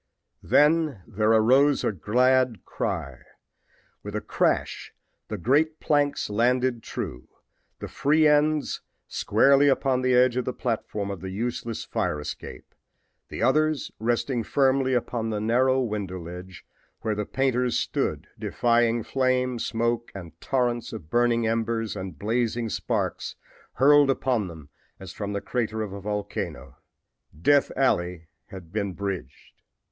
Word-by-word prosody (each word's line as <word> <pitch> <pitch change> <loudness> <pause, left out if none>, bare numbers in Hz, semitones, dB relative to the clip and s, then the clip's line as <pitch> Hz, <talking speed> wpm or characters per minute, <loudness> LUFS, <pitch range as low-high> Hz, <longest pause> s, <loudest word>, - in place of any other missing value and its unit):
Then 150 - +3
there 110 +4 +1
arose 130 +6 +4
a - - +1
glad 125 +5 +2
cry. - - -4 0.8
With - - -7
a - - 0
crash - - -1 0.3
the 105 - -4
great 150 - +1
planks 145 -1 +1
landed 120 +3 +1
true, 60 - -6 0.5
the - - -7
free 150 +2 +2
ends 150 0 +2 0.3
squarely 140 +1 +3
upon 135 -1 +2
the 130 0 +2
edge 125 0 +4
of 125 - -1
the 125 - -2
platform 105 -4 -3
of 100 - -7
the 95 - -5
useless 115 +2 -4
fire 85 -5 -2
escape, 75 - -8 0.6
the - - -4
others 155 0 +2
resting 120 +2 0
firmly 130 +1 +2
upon 115 -2 -2
the 105 -1 -2
narrow 125 +4 +2
window 105 -6 -3
ledge 90 +2 -9 0.4
where 110 -1 -1
the 105 0 -2
painters 125 0 0
stood - - -1
defying 120 -1 +1
flame, 130 -1 0
smoke 115 +1 -1
and 90 -4 -8
torrents 120 -3 -1
of 80 -8 -9
burning 120 -1 +2
embers 115 -1 -1
and 95 -5 -6
blazing 115 - -1
sparks - - -2 0.4
hurled 145 +1 +5
upon 125 -6 0
them 80 -4 -11 0.3
as 95 -3 -9
from 105 -1 -4
the 100 - -2
crater 110 -3 -2
of 100 -2 -6
a 100 - -7
volcano. 100 -10 -4 0.6
Death 145 - +3
alley 90 -10 0 0.2
had 90 -3 -11
been 100 -3 -2
bridged! 95 -10 -6
115 Hz, 135 wpm, -25 LUFS, 100-130 Hz, 0.8 s, hurled